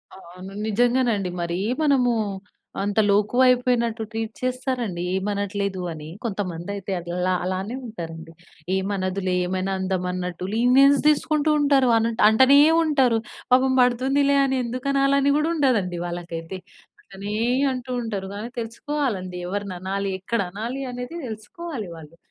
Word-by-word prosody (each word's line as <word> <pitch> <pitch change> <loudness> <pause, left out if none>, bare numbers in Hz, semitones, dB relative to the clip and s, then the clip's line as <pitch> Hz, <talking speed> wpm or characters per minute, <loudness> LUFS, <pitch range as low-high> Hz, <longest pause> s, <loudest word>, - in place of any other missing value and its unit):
ఆ! - - -12 0.2
అవును. 185 +2 -10
నిజంగానండి. 235 -3 +2
మరీ 170 +1 -2 0.2
మనము 265 -5 +3 0.7
అంత 205 +2 0
లోకువ 210 +5 +3
అయిపోయినట్టు 245 -2 +2
ట్రీట్ 225 0 -4
చేస్తారండీ 255 -7 -2
ఏమి 190 +2 -1
అనట్లేదు 200 -2 -2
అని. 155 0 -9
కొంతమంది 190 -5 -4
అయితే 195 0 -6
అల్లా 180 +2 -1
అలానే 190 +5 -3
ఉంటారండి. 165 -6 -8 0.4
ఏమనదులే 190 -1 -1
ఏమైనా 185 +1 -2
అందామన్నట్టు 180 -1 -2
లీనియెన్స్ 265 +4 +5
తీసుకుంటూ 305 0 +2
ఉంటరు. 280 -3 +4
అనటు 225 0 0
అంటనే 260 +5 +6 0.2
ఉంటరు. 265 -7 +3 0.4
పాపం 260 +1 +4
పడుతుందిలే 270 +3 +2
అని 265 -1 0
ఎందుకనాలి 275 +3 +1
అని 280 +1 +3
గూడా 305 +2 +1
ఉండదండి 210 - +1
వాళ్ళకైతే. 175 +1 -6 0.4
అట్లనే 205 - -7 0.4
అంటూ 255 0 -5
ఉంటరు 205 -4 -4
గానీ 220 +4 -5
తెలుసుకోవాలండి 230 - -3
ఎవరిననాలి 195 0 -3
ఎక్కడనాలి 220 +5 -3
అనేది 245 +6 -6
తెలుసుకోవాలి 220 - -7
వాళ్ళు. 160 0 -13
220 Hz, 120 wpm, -23 LUFS, 185-255 Hz, 0.7 s, అంటనే